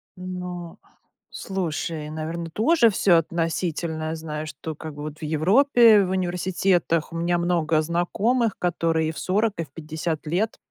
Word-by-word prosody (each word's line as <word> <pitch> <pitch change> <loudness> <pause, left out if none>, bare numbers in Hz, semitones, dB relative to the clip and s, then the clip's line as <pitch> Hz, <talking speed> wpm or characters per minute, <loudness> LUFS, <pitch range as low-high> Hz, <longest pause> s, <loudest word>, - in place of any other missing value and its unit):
Но 180 -2 -6 0.5
Слушай, 165 -4 -3
наверно, 165 +2 -5
тоже 235 - +4
всё 190 -3 +4
относительно. 165 -1 -2
Знаю, 155 -1 -5
что 155 +2 -7
как 155 0 -8
вот 150 +1 -7
в - - -10
Европе 215 - +5
в - - -4
университетах 180 -2 0
у - - -4
меня 175 +1 +1
много 170 -2 +1
знакомых, 200 +8 0
которые 165 -2 0
и - - -2
в 155 - -8
40, 210 +3 +1
и 165 - -1
в 140 - -27
50 160 +1 -4
лет 195 +8 -1
170 Hz, 145 wpm, -24 LUFS, 160-185 Hz, 0.5 s, Европе